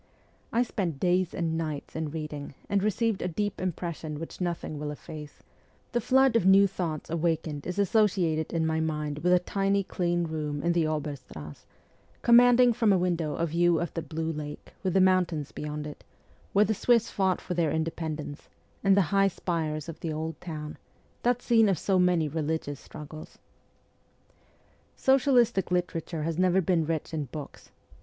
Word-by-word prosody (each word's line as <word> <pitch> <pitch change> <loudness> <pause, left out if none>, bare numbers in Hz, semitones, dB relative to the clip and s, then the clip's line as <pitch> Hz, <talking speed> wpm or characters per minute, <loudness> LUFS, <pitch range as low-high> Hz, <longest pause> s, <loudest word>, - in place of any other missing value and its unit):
I 235 +2 +3
spent 180 - -3
days 180 +1 +2
and 165 -2 -1
nights 155 -3 -4
in 160 -1 -2
reading, 150 -2 -6
and 200 -1 +1
received 215 0 0
a - - -1
deep 205 +3 -2
impression 170 -4 -4
which 165 +3 -8
nothing 170 -4 -3
will 150 0 -3
efface; 150 0 -9 0.5
the 240 - 0
flood 265 +1 +4
of 230 - +4
new 195 +2 +7
thoughts 170 -6 -3
awakened 160 -3 -1
is 180 - -4
associated 190 -6 +2
in 165 -1 0
my 160 0 0
mind 150 -2 -2
with 180 +3 +1
a 180 - +7
tiny 195 +2 0
clean 175 -2 -1
room 150 -3 -3
in 170 - +2
the 165 -2 +2
Oberstrass, 140 - -6 0.6
commanding 245 +1 +6
from 225 -2 +3
a 190 - +5
window 175 -4 0
a 170 - 0
view 170 0 +2
of 170 - -3
the 165 - -2
blue 160 +1 -3
lake, 150 -1 -7
with 190 -2 -1
the 190 - +5
mountains 180 -6 +2
69 - - -8
beyond 150 0 -4
it, 150 - -9 0.5
where 205 +1 +4
the 220 - +1
Swiss 235 +2 +2
fought 190 -2 +1
for 180 - -5
their 170 -3 +1
inde 160 +1 -1
pendence, 155 -3 -5 0.3
and 195 0 +5
the - - +6
high 195 0 +5
spires 160 -5 -2
of 165 - -7
the 165 - -3
old 160 +1 -4
town 150 -3 -6 0.4
that 245 0 +1
scene 225 -3 +4
of 190 - +2
so 190 +4 +1
many 180 -3 +3
religious 150 -1 -2
struggles. 155 +1 -10 1.6
Socialistic 245 -7 +3
literature 175 -3 -2
has 165 +1 -2
never 185 0 +4
been 170 -4 +1
rich 160 -1 -2
in 155 -2 -2
books. 145 +3 -9
170 Hz, 175 wpm, -28 LUFS, 155-190 Hz, 1.6 s, new